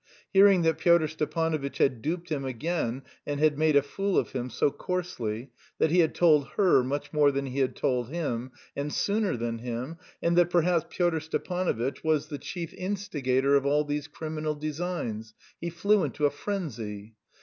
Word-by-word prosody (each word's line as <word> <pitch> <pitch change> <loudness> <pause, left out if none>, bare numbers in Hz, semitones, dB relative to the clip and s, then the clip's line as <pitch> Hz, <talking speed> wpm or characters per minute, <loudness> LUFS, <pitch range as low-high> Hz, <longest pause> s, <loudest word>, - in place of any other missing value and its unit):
Hearing 195 -2 +6
that 160 0 +2
Pyotr 170 -2 +4
Stepanovitch 155 -1 -2
had 125 -4 +2
duped 170 +4 -3
him 145 -4 -2
again 130 0 -2 0.2
and 145 -1 -2
had 150 -1 +3
made 155 -1 +3
a 140 - +6
fool 195 +7 -1
of - - +1
him 125 -2 -3
so 140 - +1
coarsely, 130 -12 -4 0.3
that 155 - +2
he 180 - +4
had 160 -2 +3
told 150 -5 +4
her 185 -10 +5
much 140 +5 -3
more 145 -2 +5
than 140 0 -2
he 135 +1 -4
had 130 -2 +1
told 125 -2 0
him, 130 -6 -3 0.2
and 145 +1 -3
sooner 205 - 0
than 115 0 -3
him, 125 +6 -5 0.2
and 170 0 +1
that 175 -1 +4
perhaps 175 -1 +2
Pyotr 175 -3 +1
Stepanovitch 160 -5 -2
was 155 -1 +1
the 145 -3 -5
chief 170 -3 -6
instigator 145 -9 0
of 140 0 +2
all 145 +1 +3
these 145 0 -3
criminal 155 0 -4
designs 150 -8 -4 0.2
he 170 - -3
flew 200 +4 +2
into 150 - -1
a 145 - +3
frenzy. 115 - -5
150 Hz, 180 wpm, -28 LUFS, 135-170 Hz, 0.3 s, Hearing